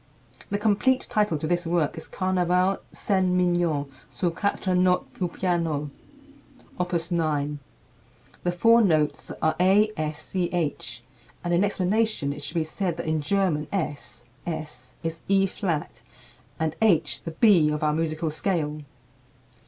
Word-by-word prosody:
The 205 - 0
complete 220 +5 +2
title 210 -7 +2
to 150 - -4
this 175 +1 0
work 165 -3 +1
is 160 - -8
"Carnaval 185 0 +1
Scènes 190 -3 +1
Mignonnes 175 -5 +1 0.2
sur 175 -2 -1
Quatre 190 +1 -1
Notes 180 0 +3
pour 180 -2 -2
Piano, 165 -5 -1 0.9
Op. 180 0 -1 0.2
9." 150 -3 0 0.8
The 175 - 0
four 230 +7 +5
notes 155 -7 +1
are 160 0 +3
A 200 +4 +4
S 155 -1 -3
C 175 +2 -2
H, 145 -8 -2 0.4
and 175 0 -1
in 175 +3 +4
explanation 205 -5 +1
it 145 - -9
should 145 +4 -5
be 165 - +2
said 170 +2 -2
that 170 - -4
in 155 -1 0
German 160 -3 0
S 160 -11 -4 0.2
(es) 155 -6 -6
is 165 0 -4
E 195 0 +4
flat, 165 - -3 0.6
and 160 0 -1
H 205 -8 +3
the - - -5
B 165 -2 +4
of 150 0 -2
our 150 0 +2
musical 160 0 -1
scale. 155 -3 -1
170 Hz, 145 wpm, -25 LUFS, 155-190 Hz, 0.9 s, four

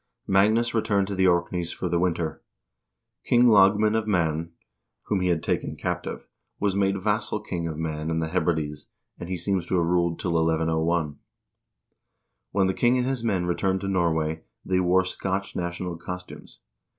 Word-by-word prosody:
Magnus 110 +5 +3
returned 105 -3 +1
to - - -2
the 95 0 +3
Orkneys 85 -1 0
for 90 - -4
the 85 0 +1
win 90 -1 +1
ter. 80 -3 -4 0.8
King 120 0 +4
Lagman 105 0 +5
of 110 -1 0
Man, 85 -4 0 0.5
whom 100 - 0
he 90 - 0
had 85 -3 +1
taken - - -1
captive, - - -4 0.3
was 100 -2 0
made 100 0 +1
vassal 105 +2 -1
king 85 -4 -4
of 80 -2 -5
Man 80 -1 -3
and 80 0 0
the 80 0 -2
Hebrides, 80 -4 -1 0.3
and 85 - -7
he 95 - -2
seems 95 +1 -1
to 95 - +1
have 85 - +2
ruled 85 -1 +1
till 90 - -2
1101. 80 -1 +1 1.3
When 100 -1 +2
the 95 - +1
king 120 +5 +3
and 125 - +1
his 130 -2 -2
men 95 -6 0
returned 95 +2 0
to 100 - -3
Norway, 80 -4 0 0.2
they 95 -1 +1
wore 90 +1 +3
Scotch 95 +1 -3
national 85 0 -3
costumes. 90 +2 -9
90 Hz, 175 wpm, -25 LUFS, 85-100 Hz, 1.3 s, Lagman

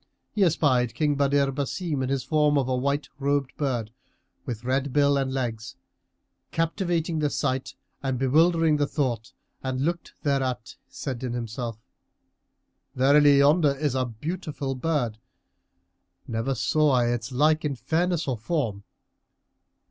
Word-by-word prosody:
He 210 - -2
espied 130 - +2
King 150 +1 +2
Badr 140 -1 +2
Basim 145 +2 -2
in 130 - -1
his 135 -2 -1
form 150 -1 +2
of 135 -2 +1
a 130 - 0
white 140 +3 -1
robed 140 -1 0
bird, 120 -7 -2 0.6
with 120 -2 -4
red 130 +2 0
bill 140 +1 +3
and 135 -1 0
legs, 120 -4 -3 0.7
captivating 165 -1 -1
the 150 -1 +1
sight 130 -1 -2 0.3
and 130 -2 -1
bewildering 160 +4 +3
the 145 -1 +1
thought; 125 -7 -2 0.3
and, 130 -1 -2
looking 170 +4 -2
thereat, 135 -5 -1
said 130 -3 -5
in 125 -2 -2
himself 115 -1 -4 1.2
"Verily, 140 +2 +5
yonder 145 +1 +4
is 145 -2 0
a 130 -1 0
beautiful 145 - -4
bird: 130 -6 -1 1.1
never 115 +4 -1
saw 145 +7 +2
I 120 -2 +3
its 120 +1 -2
like 155 +5 +3
in 145 -2 -1
fairness 170 +4 0
or 125 -4 -1
form." 115 -7 -2
140 Hz, 140 wpm, -26 LUFS, 125-150 Hz, 1.2 s, Verily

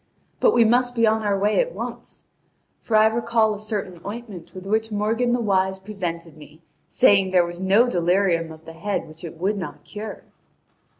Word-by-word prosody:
But - - +4
we 235 -1 +5
must 245 +2 +2
be 230 -1 +3
on 220 0 +2
our 205 -2 0
way 205 +2 +2
at - - 0
once! - - -8 0.6
For 225 - -2
I 215 0 +6
recall 225 -1 +2
a 205 - -7
certain 205 -5 -5
ointment 205 -4 -8
with 185 0 -8
which 220 +2 0
Morgan 225 +4 0
the 245 - +1
Wise 190 -3 +1
presented 175 -5 -6
me, 155 +2 -16 0.2
saying 195 -6 +4
there 180 -2 +4
was 175 +1 -7
no 200 +6 +4
delirium 175 -4 +1
of 160 0 -13
the 165 - -10
head 195 +5 -3
which 155 +2 -14
it 165 -1 -8
would 200 +4 -1
not 180 - -7
cure." 210 0 -8
200 Hz, 190 wpm, -23 LUFS, 175-220 Hz, 0.6 s, I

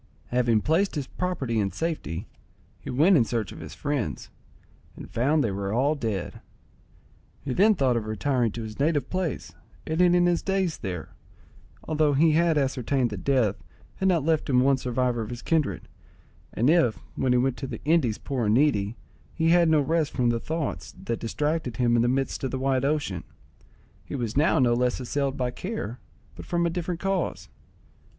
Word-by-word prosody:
Having 120 -3 +2
placed 170 - +1
his 145 -3 -2
property 135 -10 -2
in 100 -2 0
safety, 155 - -3 0.5
he - - -9
went 160 +10 +4
in 130 - +5
search 115 -4 -2
of - - -10
his - - -9
friends, 135 - -3 0.6
and - - -9
found 145 +6 +2
they 110 - 0
were 100 0 -3
all 135 +7 +2
dead. 110 - -4 1.0
He 135 - -2
then 210 - +5
thought 130 -6 +2
of 110 -2 -2
retiring 120 +2 0
to 115 - -5
his 110 +1 -8
native 145 -2 +1
place, 185 -5 -3 0.3
and 160 +2 0
ending 175 0 +5
his 175 -1 +2
days 190 -4 -1
there, 90 -6 -5 0.7
although 155 -2 +1
he 155 +4 +4
had 165 0 +3
ascertained 135 -2 0
that 100 -3 -6
death 125 -8 +1 0.3
had 190 - +1
not 170 -6 +2
left 160 -2 +1
him 125 -2 +4
one 135 +1 +4
survivor 125 -1 -1
of 110 - -5
his 120 -1 -7
kindred; 160 -3 0 0.6
and 120 - 0
if, 150 -8 +4 0.2
when 130 - +1
he 125 - +4
went 130 0 +1
to 135 - -5
the - - -7
Indies 150 -9 +2
poor 130 -5 -2
and 105 - +3
needy, 115 -6 +2 0.4
he 165 -1 +2
had 170 -1 +5
no 155 -1 +4
rest 155 +1 0
from 120 -2 +2
the 115 - -1
thoughts 145 - -4
that 115 - -3
distracted 145 +1 -2
him 120 -1 +3
in 115 - +4
the 120 - +2
midst 135 +2 -1
of 135 - 0
the 130 - -3
wide 130 -1 +1
ocean, 140 - -1 0.8
he - - -6
was 120 -4 -3
now 155 +3 +3
no 125 -4 +4
less 125 +1 +1
assailed 135 +2 -2
by 125 -1 -1
care, 130 - -5 0.4
but - - -9
from 170 -1 0
a 170 - +1
different 175 0 -3
cause. 195 -1 -2
135 Hz, 190 wpm, -26 LUFS, 120-160 Hz, 1.0 s, in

